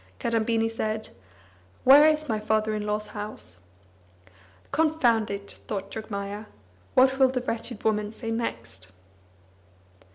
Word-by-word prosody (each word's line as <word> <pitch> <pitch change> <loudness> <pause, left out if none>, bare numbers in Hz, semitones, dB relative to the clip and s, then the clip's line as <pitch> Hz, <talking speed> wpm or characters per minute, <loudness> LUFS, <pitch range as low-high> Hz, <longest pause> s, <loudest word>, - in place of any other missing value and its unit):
Kadambini 225 0 +1
said: 220 -1 -3 0.7
"Where 285 +4 +9
is 310 0 +1
my 220 -3 0
father 215 0 +1
in 210 0 -3
law's 210 0 -1
house?" 210 - -6 1.1
"Confound 275 -9 +2
it!" 200 0 -6
thought 195 -1 -4
Jogmaya. 205 -1 -5 0.5
"What 265 +1 +5
will 265 - +7
the 255 -1 -1
wretched 230 -2 -4
woman 210 -1 +1
say 225 0 -6
next?" 115 - -4
220 Hz, 120 wpm, -26 LUFS, 210-240 Hz, 1.1 s, Where